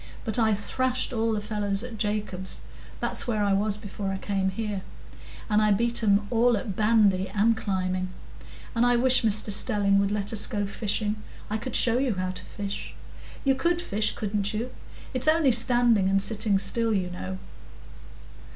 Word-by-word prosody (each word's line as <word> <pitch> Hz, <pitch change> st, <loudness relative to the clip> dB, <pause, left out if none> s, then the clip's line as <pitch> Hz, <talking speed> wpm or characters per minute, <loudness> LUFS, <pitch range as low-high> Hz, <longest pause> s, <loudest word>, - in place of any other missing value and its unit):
"But 225 Hz, +1 st, 0 dB
I 220 Hz, -2 st, +3 dB
thrashed 255 Hz, +5 st, -1 dB
all 225 Hz, -1 st, 0 dB
the 215 Hz, -, 0 dB
fellows 205 Hz, -1 st, -2 dB
at 235 Hz, -3 st, -8 dB
Jacob's—that's 205 Hz, +1 st, -3 dB
where 215 Hz, -3 st, 0 dB
I 200 Hz, -1 st, +2 dB
was 205 Hz, +1 st, +1 dB
before 205 Hz, -2 st, -5 dB
I 195 Hz, -, -3 dB
came 195 Hz, -1 st, -1 dB
here. 205 Hz, 0 st, -3 dB, 0.7 s
And 210 Hz, -1 st, +2 dB
I 215 Hz, -, +3 dB
beat 235 Hz, +4 st, +2 dB
'em 205 Hz, -1 st, +3 dB
all 240 Hz, 0 st, +3 dB
at 200 Hz, -1 st, -5 dB
bandy 210 Hz, -3 st, +3 dB
and 225 Hz, +3 st, +3 dB
climbing. 185 Hz, -3 st, -2 dB, 0.6 s
And 230 Hz, -, +2 dB
I 245 Hz, 0 st, +4 dB
wish 255 Hz, +1 st, +4 dB
Mr 215 Hz, -1 st, +2 dB
Stelling 200 Hz, 0 st, +3 dB
would 200 Hz, 0 st, +1 dB
let 205 Hz, +1 st, -2 dB
us 210 Hz, -, +3 dB
go 205 Hz, -1 st, -2 dB
fishing. 210 Hz, +1 st, -2 dB, 0.3 s
I 215 Hz, -, 0 dB
could 235 Hz, +4 st, -5 dB
show 240 Hz, 0 st, +4 dB
you 260 Hz, -6 st, 0 dB
how 185 Hz, 0 st, -2 dB
to 185 Hz, 0 st, -9 dB
fish. 200 Hz, +1 st, -6 dB, 0.5 s
You 270 Hz, -, +3 dB
could 340 Hz, +6 st, 0 dB
fish, 215 Hz, -, 0 dB
couldn't 205 Hz, 0 st, -2 dB
you? 235 Hz, +4 st, -3 dB, 0.4 s
It's 255 Hz, +1 st, +1 dB
only 310 Hz, -3 st, +4 dB
standing, 235 Hz, -4 st, +3 dB
and 195 Hz, 0 st, +3 dB
sitting 210 Hz, 0 st, +1 dB
still, 220 Hz, +3 st, 0 dB
you 180 Hz, -2 st, -1 dB
know." 185 Hz, +1 st, -5 dB
210 Hz, 175 wpm, -26 LUFS, 200-230 Hz, 0.7 s, I